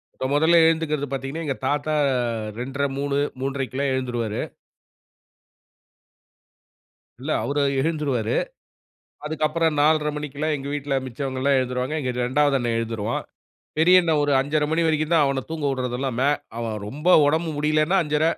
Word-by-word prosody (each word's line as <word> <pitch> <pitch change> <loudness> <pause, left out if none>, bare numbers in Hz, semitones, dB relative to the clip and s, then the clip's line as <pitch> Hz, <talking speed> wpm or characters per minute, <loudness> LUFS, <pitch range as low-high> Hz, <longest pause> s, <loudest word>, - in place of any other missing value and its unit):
இப்போ - - -4
மொதல 160 +3 +4
எழுந்துக்குறது 155 -3 +1
பாத்தீங்கன்னா, 135 +4 -4
எங்க 135 -3 -1
தாத்தா, 145 +2 0 0.7
2:30 140 +3 -2
3:00,, 140 0 -1 0.2
3:30- 135 0 -1
கெல்லாம் 140 +1 -1
எழுந்துடுவாரு. 120 -4 -2 2.8
இல்ல, 145 +5 -4
அவரு 145 +1 0 0.2
எழுந்துருவாரு. 140 -7 0 0.9
அதுக்கப்புறம் 155 +1 0
4:30 150 0 +3
மணிக்கெல்லாம் 150 +1 -2
எங்க 140 +1 -7
வீட்ல 145 -1 -2
மிச்சவங்கல்லாம் 135 +2 -1
எழுந்துருவாங்க. 125 +2 -2
எங்க 130 -3 -2
2வது 140 +2 +2
அண்ணன் 120 -2 -1
எழுந்துருவான். 115 -1 -3 0.5
பெரிய 180 +3 +7
அண்ணன் 160 -3 +1
ஒரு 145 - +1
5:30 150 +2 0
மணி 165 +1 +1
வரைக்கும் 155 +1 0
தான் 155 -3 +5
அவன 135 -1 -1
தூங்க 160 -3 -2
உடறதெல்லாம் 130 -1 -2
மே 140 +2 +3 0.3
அவன் 115 -2 -3
ரொம்ப 150 +10 -3 0.2
உடம்பு 160 +3 +1
முடியலன்னா, 155 +5 +2
5:30 150 +1 +1
145 Hz, 135 wpm, -23 LUFS, 130-155 Hz, 2.8 s, பெரிய